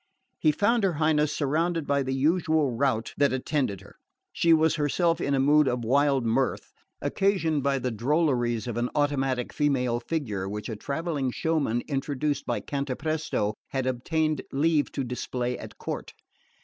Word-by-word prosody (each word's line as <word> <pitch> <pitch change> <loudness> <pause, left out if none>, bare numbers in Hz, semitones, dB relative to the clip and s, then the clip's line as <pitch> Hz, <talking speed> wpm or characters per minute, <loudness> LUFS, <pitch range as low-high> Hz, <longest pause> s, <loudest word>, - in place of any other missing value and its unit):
He 155 - +4
found 205 +8 +2
her 190 -3 +2
Highness 150 -1 +2
surrounded 160 +3 0
by 140 0 +1
the 130 0 -2
usual 155 0 +2
rout 115 -2 0
that 145 -1 +3
attended 130 - -1
her. 100 - -16 0.4
She 170 - +2
was 160 0 +5
herself 165 +3 +1
in 140 - +1
a - - +1
mood 145 +2 +4
of 125 -2 -1
wild 140 0 +2
mirth, 130 +4 0 0.3
occasioned 180 -7 +1
by 140 0 +1
the 125 -1 -2
drolleries 120 -1 +1
of 120 -2 -4
an 120 +1 0
automatic 135 -4 0
female 125 -5 +1
figure 115 -9 -3
which 105 +3 -5
a 110 - -3
travelling 140 +3 -2
showman 140 -4 0
introduced 140 0 -2
by 120 -4 -1
Cantapresto 140 -4 -2
had 135 -1 -2
obtained 155 +4 0
leave 150 +1 +2
to 140 - -2
display 125 0 -3
at - - -10
court. - - -6
140 Hz, 160 wpm, -27 LUFS, 125-155 Hz, 0.4 s, was